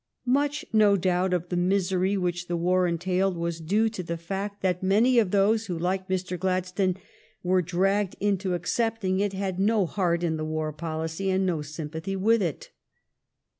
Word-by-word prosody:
Much, 285 +3 +1
no 210 -2 +5
doubt, 185 0 +1
of 175 -1 -1
the 180 - -2
misery 185 +1 +1
which 175 -1 -2
the 175 - -1
war 180 +1 +2
entailed 180 +2 0
was 170 0 -3
due 205 +8 +2
to 215 -4 -4
the 170 -1 -4
fact 195 +4 -5
that 180 -2 +1
many 220 +6 +4
of 215 -5 +2
those 210 +3 +2
who, 175 -3 -3
like 185 +2 -1
Mr. 185 -1 -2
Gladstone, 185 0 0 0.5
were 185 +1 +3
dragged 190 +3 0
into 195 -2 0
accepting 215 -1 -1
it 200 -1 0
had 190 -1 -3
no 210 0 +3
heart 175 -1 0
in 160 -2 0
the 155 - -3
war 155 0 -2
policy 160 +4 -3
and 190 0 +1
no 170 -4 0
sympathy 160 +5 -5
with 220 +4 +3
it. 170 -6 -3
185 Hz, 175 wpm, -26 LUFS, 175-200 Hz, 0.5 s, no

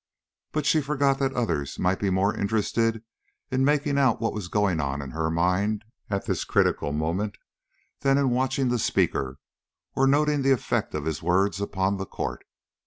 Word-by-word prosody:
But 150 -2 -1
she 155 +2 +3
forgot 140 -1 +1
that 135 -1 0
others 80 - -1
might 95 +1 +1
be 100 - 0
more 95 +3 +1
interested 110 +2 0 0.5
in 130 0 +2
making 145 0 +2
out 130 -5 +3
what 115 -2 -1
was 105 -5 -5
going 100 -3 +1
on 70 -1 -2
in 70 -2 -6
her 80 +2 -1
mind 95 +6 0 0.2
at 100 -1 -2
this - - -1
critical 70 - +1
moment 85 +8 -2 0.6
than 135 0 +3
in 140 -3 +2
watching 130 +1 +1
the 120 -1 +1
speaker 65 -9 0 0.6
or 135 - +3
noting 145 +1 +3
the 135 0 +4
effect 125 - -1
of 75 -1 -3
his 80 -2 -2
words 95 +4 +1
upon 100 0 0
the 95 -1 -5
court. - - -4
105 Hz, 175 wpm, -26 LUFS, 90-135 Hz, 0.6 s, the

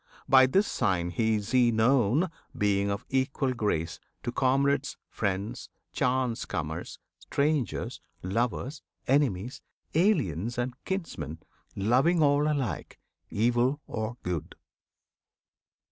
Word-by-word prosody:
By 130 -1 +7
this 195 +10 +3
sign 90 - 0
is 110 -1 +1
he 125 -2 +5
known 125 - +3 0.3
Being 100 -2 +2
of 100 +2 -3
equal 130 0 0
grace 85 -9 -1 0.2
to 120 - -2
comrades, 135 +2 +1
friends, 100 0 -2 0.2
Chance 125 -2 0
comers, 80 +1 -4 0.2
strangers, 140 - -1 0.2
lovers, 120 - -1 0.2
enemies, 125 -5 +1 0.3
Aliens 125 - +1
and 125 +1 -1
kinsmen; 165 - -4 0.4
loving 130 - +3
all 145 +1 +3
alike, 130 - -3 0.3
Evil 120 +5 +2
or 110 +2 -4
good. 90 -3 -3
120 Hz, 100 wpm, -28 LUFS, 100-140 Hz, 0.4 s, By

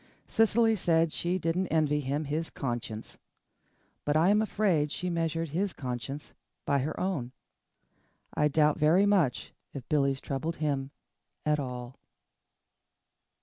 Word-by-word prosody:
Cecily 225 0 +3
said 165 -4 +2
she 175 +2 0
didn't 180 +2 0
envy 155 -2 +2
him 145 +2 -2
his 155 +3 -2
conscience. 120 -4 -5 0.8
But 150 +1 +2
I 165 +4 +4
am 210 +1 +4
afraid 190 -9 +1
she 180 +2 -2
measured 165 -1 -1
his 185 +6 -1
conscience 130 +3 -5 0.3
by 140 -1 +2
her 150 +4 -3
own. 145 -10 -2 1.0
I 150 - +3
doubt 150 0 +3
very 165 +6 +5
much 185 -11 +1 0.2
if 135 -3 -7
Billy's 140 -3 +2
troubled 140 +6 -3
him 140 -4 -1 0.6
at 150 0 +2
all. 125 -2 -6
155 Hz, 130 wpm, -29 LUFS, 140-175 Hz, 1.0 s, very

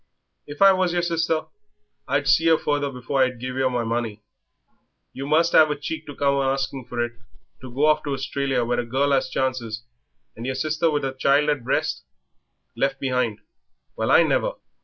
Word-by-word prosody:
"If 145 +5 -1
I 195 - +9
was 185 -2 0
yer 175 -1 0
sister 165 -2 0 0.6
I'd - - 0
see 165 - +4
yer 165 -1 +5
further 145 -2 -1
before 130 +2 -2
I'd 130 -2 +1
give 125 +1 -5
yer 130 0 +1
my 125 -2 -1
money. 115 -2 -3 0.9
You 135 +1 -6
must 165 +3 +3
'ave 155 -1 +6
a 150 - -2
cheek 160 +2 -6
to 145 - -8
come 140 -1 +1
a - - +1
asking 135 -1 -2
for 120 -1 -1
it, 120 - -7 0.5
to 130 -1 -10
go 140 +5 +1
off 155 0 +3
to 145 - -2
Australia 135 -1 -1
where 120 +1 0
a - - 0
girl 140 +4 +1
'as 130 -1 +1
chances, 120 -4 -2 0.5
and 115 - -8
yer 130 - -2
sister 155 +4 0
with 145 -2 -1
a 135 - -3
child 140 +3 +2
at 145 - +1
the - - -17
breast 130 - -1 0.7
left 135 0 -1
behind. 125 -5 -1 0.5
Well - - -2
I - - +6
never!" - - 0
135 Hz, 200 wpm, -23 LUFS, 125-150 Hz, 0.9 s, I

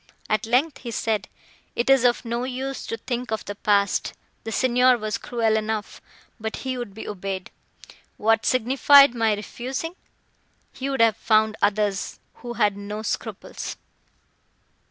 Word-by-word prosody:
At 215 +2 +1
length 260 +6 +2
he 245 - -7
said, 220 -2 -1 0.5
"It 235 - 0
is 270 -2 +5
of 240 -1 +2
no 235 +1 -2
use 260 +1 -4
to 230 - -3
think 245 0 -4
of 220 0 -3
the 205 - -4
past; 200 -1 +1 0.3
the 225 - -4
Signor 250 +1 +4
was 215 -1 -3
cruel 225 -2 0
enough, 215 -1 -3 0.4
but 220 0 -3
he 260 -1 -1
would 240 -6 -6
be 220 - -7
obeyed. 195 -2 -5 0.7
What 225 +1 +2
signified 270 +2 +6
my 225 -3 +2
refusing? 260 - -5 0.8
He 265 +1 -4
would 270 -3 0
have 225 -2 +4
found 215 -1 +3
others, 205 -1 0 0.2
who 240 -1 -7
had 210 -4 +2
no 205 +2 -6
scruples." - - -5
230 Hz, 150 wpm, -24 LUFS, 215-250 Hz, 0.8 s, signified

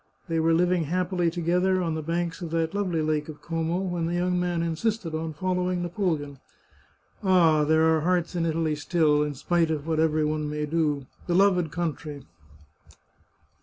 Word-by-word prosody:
They 165 -1 0
were 160 +1 +2
living 175 -1 +2
happily 180 +1 0
together 180 +2 +1
on 165 -2 -1
the 160 - -3
banks 170 +2 -2
of 170 - -4
that 165 +1 -1
lovely 185 -6 -1
Lake 155 0 -1
of 150 - -10
Como 165 +1 -1
when 175 -3 -2
the 170 - -1
young 180 0 +1
man 175 -1 -1
insisted 170 +2 -2
on 160 0 -3
following 180 +1 -1
Napoleon. 160 -6 -2 0.8
Ah, 170 -5 +4
there 160 +1 +3
are 160 -1 +3
hearts 175 +1 0
in 170 - 0
Italy 160 -1 0
still, 150 -1 +2
in 150 -1 -2
spite 170 +4 +1
of 155 -2 -2
what 160 -1 0
every 155 -1 +2
one 150 0 -1
may 150 0 -2
do! 150 -3 0 0.2
Beloved 180 -2 +3
country 155 -4 -4
165 Hz, 170 wpm, -26 LUFS, 155-180 Hz, 0.8 s, Ah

